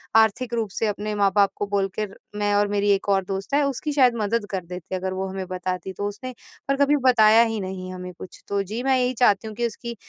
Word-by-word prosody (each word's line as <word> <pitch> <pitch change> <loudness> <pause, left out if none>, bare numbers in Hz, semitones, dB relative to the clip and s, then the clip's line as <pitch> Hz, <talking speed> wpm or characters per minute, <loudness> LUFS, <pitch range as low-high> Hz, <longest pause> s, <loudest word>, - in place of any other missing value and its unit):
आर्थिक 225 +3 +3
रूप 225 -3 -1
से 225 - 0
अपने 210 +1 -3
माँ-बाप 200 0 +3
को 205 - -1
बोल 200 -1 +1
कर 205 -2 -3 0.2
मैं 205 0 0
और 205 0 +3
मेरी 205 0 +1
एक 200 0 0
और 195 -1 +3
दोस्त 195 +7 -5
है, 290 - +4
उसकी 280 +2 -2
शायद 255 -4 +4
मदद 210 +1 0
कर 185 -3 -3
देते 180 +1 -6
अगर 185 0 -3
वो 190 +1 -3
हमें 190 0 -5
बताती 185 0 -4
तो 205 - -3
उसने 255 +5 -7 0.3
पर 275 - +2
कभी 290 +1 +3
बताया 225 -2 +6
ही 225 -2 -2
नहीं 185 -1 -5
हमें 180 0 -7
कुछ। 185 - -11
तो 200 0 +1
जी 215 +5 -5
मैं 265 -1 +3
यही 250 0 +1
चाहती 220 -4 +3
हूँ 215 - -9
कि 240 0 0
उसकी 235 +1 -7
205 Hz, 245 wpm, -24 LUFS, 190-235 Hz, 0.3 s, बताया